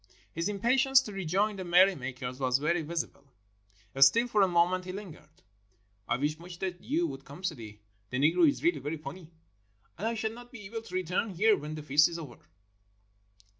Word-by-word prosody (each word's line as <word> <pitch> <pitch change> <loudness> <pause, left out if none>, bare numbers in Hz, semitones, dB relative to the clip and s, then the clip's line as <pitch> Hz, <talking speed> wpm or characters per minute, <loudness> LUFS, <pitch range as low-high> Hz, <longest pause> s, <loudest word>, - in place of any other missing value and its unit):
His 165 +4 -2
impatience 255 +6 +4
to 225 - -8
rejoin 195 +3 0
the 190 - -4
merry 180 +2 +5
makers 125 -3 -6
was 130 -1 +2
very 165 +4 0
visible; 160 -3 -4 0.8
still, 135 - +6
for 215 -3 +2
a 195 - +5
moment 180 +1 +2
he 185 - -5
lingered. 175 -6 -11 0.6
"I - - +1
wish 150 +4 -1
much 175 0 -10
that 180 -1 -4
you 320 +6 0
would - - -6
come, 145 +6 -12
Sidi. 115 - -5 0.3
The 125 - -3
Negro 160 - +4
is 285 - -4
really 345 +2 +2
very 150 +3 -4
funny. 160 +2 -9 0.7
And 215 - -1
I 230 - -1
shall 220 0 -2
not 245 +1 -12
be 225 -5 -10
able 225 +3 -5
to 185 -5 -9
return 185 +4 -1
here 215 +4 +4
when 150 -1 -6
the 155 - -7
feast 150 +2 +4
is 170 - -6
over." 145 -8 -9
180 Hz, 195 wpm, -29 LUFS, 150-210 Hz, 0.8 s, still